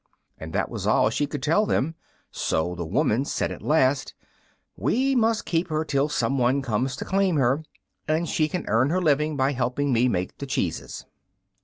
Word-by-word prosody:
And 80 Hz, 0 st, -7 dB
that -, -, 0 dB
was -, -, -4 dB
all 110 Hz, -, +3 dB
she 145 Hz, +5 st, 0 dB
could 145 Hz, 0 st, -6 dB
tell 205 Hz, +8 st, +2 dB
them, 155 Hz, +5 st, 0 dB, 0.4 s
so 85 Hz, +3 st, -1 dB
the 85 Hz, -2 st, -5 dB
woman 110 Hz, +7 st, +1 dB
said -, -, -2 dB
at -, -, -7 dB
last, 140 Hz, -3 st, +1 dB, 0.6 s
"We 255 Hz, -, +1 dB
must 230 Hz, -2 st, +2 dB
keep 170 Hz, +1 st, 0 dB
her 155 Hz, -1 st, -1 dB
till 145 Hz, 0 st, +1 dB
some 135 Hz, -2 st, 0 dB
one 130 Hz, +3 st, +2 dB
comes 125 Hz, +2 st, -1 dB
to -, -, -6 dB
claim 190 Hz, -2 st, +1 dB
her, 135 Hz, +1 st, +2 dB, 0.5 s
and 160 Hz, +2 st, 0 dB
she 155 Hz, -1 st, +1 dB
can 180 Hz, +3 st, -4 dB
earn 115 Hz, +6 st, +2 dB
her 180 Hz, +4 st, +1 dB
living 150 Hz, -2 st, +1 dB
by 135 Hz, +1 st, +2 dB
helping 130 Hz, +1 st, -1 dB
me 120 Hz, +2 st, +3 dB
make 90 Hz, -6 st, -2 dB
the -, -, -5 dB
cheeses." -, -, -3 dB
140 Hz, 190 wpm, -25 LUFS, 125-160 Hz, 0.6 s, all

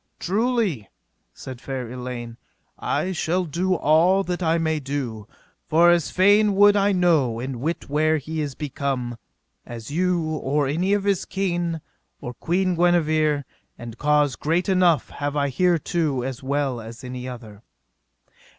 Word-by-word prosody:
Truly, 205 Hz, -, 0 dB, 0.4 s
said 125 Hz, -, -10 dB
fair 130 Hz, -3 st, -5 dB
Elaine, 120 Hz, -1 st, -7 dB, 0.4 s
I 185 Hz, -, -1 dB
shall 180 Hz, +1 st, -1 dB
do 180 Hz, +4 st, 0 dB
all 170 Hz, +5 st, +3 dB
that 180 Hz, -1 st, -3 dB
I 165 Hz, -1 st, +2 dB
may 160 Hz, -1 st, 0 dB
do, 130 Hz, -7 st, -4 dB, 0.4 s
for 170 Hz, +2 st, +5 dB
as 175 Hz, -2 st, +2 dB
fain 205 Hz, +2 st, +4 dB
would 205 Hz, +1 st, +6 dB
I 200 Hz, 0 st, +3 dB
know 160 Hz, -, +2 dB
and 130 Hz, +1 st, -4 dB
wit 165 Hz, +5 st, -3 dB
where 155 Hz, +2 st, +2 dB
he 155 Hz, +2 st, -4 dB
is 145 Hz, -3 st, -4 dB
become, 135 Hz, -4 st, -3 dB, 0.5 s
as 120 Hz, +2 st, -9 dB
you, 180 Hz, +2 st, +1 dB
or 150 Hz, -2 st, -1 dB
any 175 Hz, +8 st, 0 dB
of 205 Hz, -1 st, +1 dB
his 200 Hz, -3 st, +1 dB
kin, 175 Hz, -4 st, -2 dB, 0.4 s
or 120 Hz, -, -6 dB
Queen 185 Hz, +6 st, 0 dB
Guenever; 155 Hz, -4 st, +2 dB, 0.3 s
and 115 Hz, -1 st, -8 dB
cause 150 Hz, -2 st, +2 dB
great 165 Hz, +5 st, 0 dB
enough 180 Hz, -4 st, +2 dB
have 145 Hz, 0 st, -4 dB
I 140 Hz, -1 st, 0 dB
thereto 165 Hz, -4 st, +1 dB
as 130 Hz, 0 st, -5 dB
well 135 Hz, -2 st, -1 dB
as 115 Hz, +2 st, -10 dB
any 125 Hz, 0 st, -6 dB
other. 110 Hz, -5 st, -10 dB
155 Hz, 150 wpm, -23 LUFS, 130-180 Hz, 0.5 s, would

